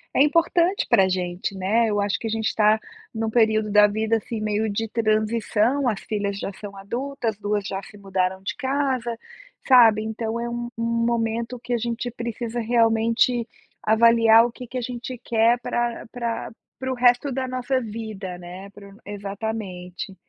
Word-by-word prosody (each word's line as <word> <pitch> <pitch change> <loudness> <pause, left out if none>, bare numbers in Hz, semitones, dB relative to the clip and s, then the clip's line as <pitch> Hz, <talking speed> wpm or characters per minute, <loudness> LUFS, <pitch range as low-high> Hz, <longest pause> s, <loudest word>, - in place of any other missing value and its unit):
é 270 - +6
importante 340 +4 +2
pra 195 -5 +5
gente, 180 +1 -2
né, 210 +5 +2
eu 205 -1 +1
acho 200 0 0
que 225 - -4
a - - -2
gente 220 0 -1
tá 215 0 +4 0.4
em 225 - -2
um 220 - 0
período 220 -2 +2
da 210 0 +7
vida 220 +2 0
assim 220 0 -5
meio 215 +1 0
de 225 +2 -2
transição, 225 +4 +1
as 215 -5 -1
filhas 200 -2 -3
já 200 - -4
são 200 0 -9
adultas, 235 +3 -3
as - - -32
2 205 -1 -1
já 195 - -3 0.2
mudaram 190 -1 -1
de 195 - -4
casa, 265 -4 -1 0.5
sabe, 230 -5 +6
então 220 +1 -3
é 235 0 -3
um 240 0 -4
um 230 0 0
momento 235 +1 -1
que 245 - -7
a 240 - +2
gente 235 +1 -3
precisa 235 0 -4
realmente 230 +1 +2 0.4
avaliar 230 +1 +6
o 240 - -3
que 250 +1 -10
que 255 +2 -6
a - - -4
gente 245 +1 -5
quer 230 +1 +3
pra 240 0 -2
pra 235 -2 -3 0.3
para 260 0 -3
o - - -1
resto 245 +3 +3
da 260 0 -2
nossa 255 +1 -1
vida, 215 -5 -6
né, 180 +3 -9
para 200 0 -13
o 200 - -16
exatamente, 200 -2 -5
225 Hz, 180 wpm, -23 LUFS, 205-240 Hz, 0.5 s, da